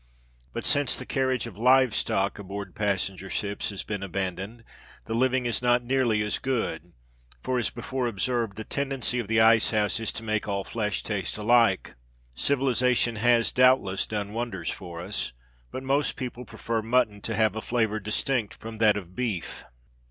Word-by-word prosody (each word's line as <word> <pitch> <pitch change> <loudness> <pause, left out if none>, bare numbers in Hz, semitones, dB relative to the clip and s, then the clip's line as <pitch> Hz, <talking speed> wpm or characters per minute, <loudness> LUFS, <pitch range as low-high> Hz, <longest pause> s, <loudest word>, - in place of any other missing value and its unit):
But - - -5
since 145 -2 +3
the - - -6
carriage 130 -3 0
of 95 - -9
live 130 0 +5
stock 100 +2 0
aboard 100 0 -6
passenger 95 -2 -1
ships 100 +1 -2
has 100 -2 -5
been 105 -2 -4
abandoned, 95 +4 -4 0.4
the 115 - -4
living 130 +1 +2
is 120 0 0
not 120 0 +3
nearly 120 -4 +1
as 105 - -1
good; 100 - -2 0.5
for, 130 -1 0
as 120 - +1
before 125 +1 -3
observed, 115 -1 -1
the 110 - -4
tendency 135 -1 -1
of 115 - -3
the 110 +1 +2
ice 115 0 +6
house 105 +1 +1
is 110 - -2
to 110 - -6
make 110 -1 -1
all 100 -1 -1
flesh 105 -2 -2
taste 100 -4 -2
alike. 115 -2 +3 0.4
Civilisation 125 - +2
has, 120 +1 +3
doubtless, 125 -7 +3
done 105 -1 -3
wonders 115 -7 -3
for 85 -3 -7
us; 95 -8 -3 0.4
but 130 - -6
most 140 +2 +1
people 125 -2 -6
prefer 115 0 -3
mutton 110 -3 +1
to 115 - -2
have 110 0 +2
a 110 - -3
flavour 110 -3 0
distinct 105 +2 -1
from 110 -1 -9
that 105 -2 +5
of 90 -2 -8
beef. 110 -7 -3
110 Hz, 175 wpm, -27 LUFS, 100-125 Hz, 0.5 s, ice